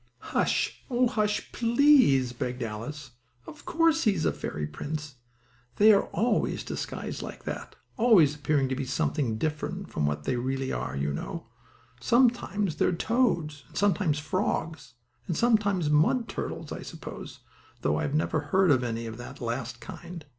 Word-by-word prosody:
"Hush! - - 0
Oh 250 0 +3
hush, 210 -3 -1
please!" 235 - +4
begged 125 0 -3
Alice. 120 +6 -6 0.3
"Of 300 -1 -12
course 325 -1 +2
he 210 -3 +4
is 160 - -1
a - - +3
fairy 75 0 -4
prince! 145 - -6 0.6
They 215 +1 +7
are 200 - +3
always 235 +4 0
disguised - - -5
like - - -8
that - - -6 0.2
always 215 - +5
appearing 145 -2 0
as 130 -1 -4
something 135 -4 0
different 150 +4 -3
from 75 - 0
what 75 0 -2
they 125 - -1
really 130 +2 -2
are, 60 +2 -3
you 70 +1 -1
know. 165 - -5 0.5
Sometimes 210 - +2
they - - +3
are - - +2
toads, 170 - 0
and - - -11
sometimes 200 -6 +2
frogs, 160 -3 -2 0.3
and 170 - -1
sometimes 205 -9 +2
mud 195 - +3
turtles, - - -5
I - - -5
suppose, - - -9 0.4
though - - +1
I - - 0
never 155 +2 0
heard 180 +4 +3
of 130 -3 +3
any 115 -1 -3
of 110 0 -6
the 120 +3 -8
last 120 0 -4
kind. 170 -2 -9
150 Hz, 160 wpm, -28 LUFS, 125-210 Hz, 0.6 s, They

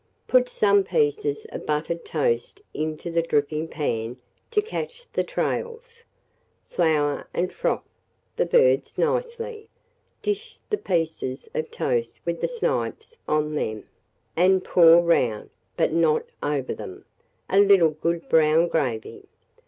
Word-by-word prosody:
Put 250 -1 +4
some 200 -1 +3
pieces 435 - 0
of - - -7
buttered 160 +3 -1
toast 465 -4 -1
into 155 +2 -4
the 165 0 +2
dripping 155 0 0
pan 115 -6 -3 0.3
to 450 - +2
catch 470 +3 -5
the - - +1
trails; 470 0 -4 0.7
flour 150 -4 +1
and 180 +1 -1
froth - - -1 0.5
the - - +1
birds - - +3
nicely, 470 -2 -2 0.5
dish 435 +3 -3
the 420 - +2
pieces 160 -7 -2
of 155 - -2
toast 120 -2 -2
with 170 -1 -2
the - - +1
snipes 475 -1 -3
on 150 0 0
them, 110 -7 -2 0.5
and 185 +2 +4
pour 170 -1 +7
round, 125 -11 +1 0.3
but - - +2
not 160 -2 +2 0.2
over 145 -3 -1
them, 95 - -9 0.4
a 195 - +3
little 195 -5 +6
good 165 +2 -2
brown 160 +1 +4
gravy. 125 -10 -2
170 Hz, 130 wpm, -24 LUFS, -, 0.7 s, pour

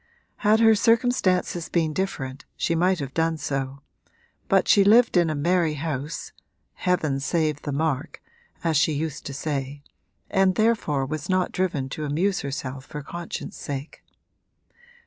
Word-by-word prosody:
Had 215 0 +3
her 225 -1 +7
circumstances 215 -6 +2
been 160 -3 +1
different 145 -7 -3
she 170 - 0
might 180 +3 +2
have 140 -3 -5
done 165 0 +1
so, 140 -2 -3 0.7
but - - +3
she 200 - +6
lived 225 +4 +5
in 175 -2 +4
a 155 - -1
merry 165 +1 +1
house 150 0 -4 0.4
(heaven 160 -7 0
save 155 +1 0
the 145 - -4
mark! 150 0 -2 0.4
as 165 -3 +2
she 155 +2 +3
used 150 0 -4
to 140 - -5
say) 140 -1 -3 0.4
and 190 -2 +2
therefore 210 -11 +1
was 150 +3 -5
not 185 -1 +1
driven 165 -8 -1
to 155 - -5
amuse 175 +7 0
herself 135 -1 -5
for 150 -1 -7
conscience 170 +3 -6
sake. 140 +1 -6
160 Hz, 145 wpm, -25 LUFS, 140-185 Hz, 0.7 s, her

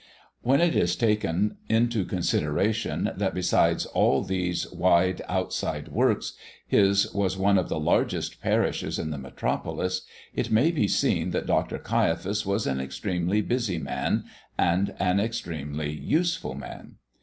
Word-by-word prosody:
When 135 +4 +3
it 175 -1 +3
is 85 0 +2
taken 105 -3 +1
into 115 -2 +2
consideration 95 +5 0
that - - -1
besides 90 -1 +2
all - - +2
these 90 -2 -1
wide 90 +1 +2
outside 95 0 -2
works, - - +1 0.3
his 100 0 +3
was 95 -2 0
one 100 0 +4
of 90 - -3
the - - -1
largest 75 - 0
parishes - - 0
in 80 - -3
the 75 - -4
metropolis, 90 +6 -2 0.3
it - - -2
may 125 +10 +4
be 145 -12 +1
seen - - +1
that - - -1
Dr. - - 0
Caiaphas 95 +6 0
was 100 +2 0
an 65 0 -1
extremely 85 +9 -1
busy 120 -7 -1
man - - -1 0.3
and 90 +3 +1
an 95 +1 +2
extremely 80 -9 -3
useful 160 - -1
man. 70 - -9
95 Hz, 140 wpm, -26 LUFS, 85-105 Hz, 0.3 s, one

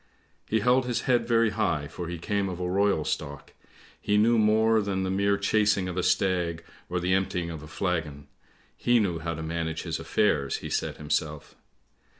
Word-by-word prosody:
" - - -37
He 110 0 +1
held 125 +3 +3
his 120 - -1
head 120 -2 +1
very 115 -2 +3
high 95 -9 -1
for 85 +2 -7
he 85 0 -4
came 100 +3 -1
of 90 -1 -6
a 90 - -2
royal 100 -3 +1
stock! 70 -1 -4 0.5
He 105 - +1
knew 115 +2 +4
more 110 +1 +4
than 100 -2 -2
the 95 - -1
mere 100 +1 +2
chasing 105 -1 +2
of 90 - -4
a 90 - 0
stag, 90 -2 0 0.3
or 90 +1 -1
the 90 +1 0
emptying 95 -3 -1
of 80 -2 -7
a 75 - -10
flagon; 80 -6 -3 0.5
he 120 0 +3
knew 90 -6 0
how 85 0 -3
to 80 - -6
manage 80 0 -3
his 80 -2 -3
affairs, 75 -10 +1
he - - -5
said - - -2
himself. 75 -1 -3
95 Hz, 195 wpm, -27 LUFS, 85-105 Hz, 0.5 s, knew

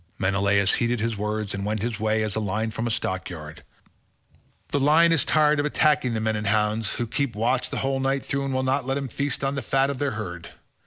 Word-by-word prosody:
Menelaus 100 +1 +2
heeded 120 0 +1
his 115 0 -1
words 105 0 -3
and 100 0 -4
went 105 0 -2
his 115 -3 -3
way 110 0 +1
as 105 -2 -1
a - - 0
lion 110 +2 -2
from 115 +2 -3
a - - -1
stockyard—the 90 - -6
lion 155 +4 +5
is 160 -6 +3
tired 150 -1 +3
of 145 - +1
attacking 150 -5 +2
the - - 0
men 110 0 0
and 105 -1 -3
hounds, 105 +1 +1
who 120 - -2
keep 120 +1 -2
watch 120 +4 0
the - - -4
whole 135 0 0
night 135 0 0
through 140 0 -1
and 135 - -2
will 130 0 0
not 130 0 0
let 135 +1 0
him 140 -1 -3
feast 140 +2 -2
on 135 0 0
the 135 - -3
fat 135 +3 +1
of 135 - -6
their 145 - +1
herd. 90 -5 -6
115 Hz, 230 wpm, -24 LUFS, 105-135 Hz, -, lion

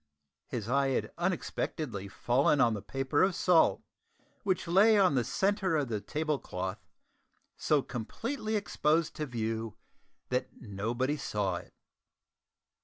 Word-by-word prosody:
His 110 -4 -4
eye 135 +3 +2
had 135 - -1
unexpectedly 155 - -2
fallen 125 +8 +2
on 115 -3 +4
the 105 - -4
paper 135 +5 -1
of 190 -1 +3
salt 175 -3 +4 0.6
which 190 -4 -1
lay 205 +5 +6
on 190 -6 +5
the 125 -3 +2
centre 190 - +1
of 140 -4 -1
the 105 -3 -2
table 150 +6 -1
cloth, 95 +1 -4 0.8
so 150 -3 +2
completely 220 - -4
exposed 165 -6 +1
to 150 - -2
view 115 -2 -3 0.5
that 125 0 -1
nobody 120 +7 -2
saw 105 -9 -1
it! 85 - -12
135 Hz, 130 wpm, -31 LUFS, 115-170 Hz, 0.8 s, lay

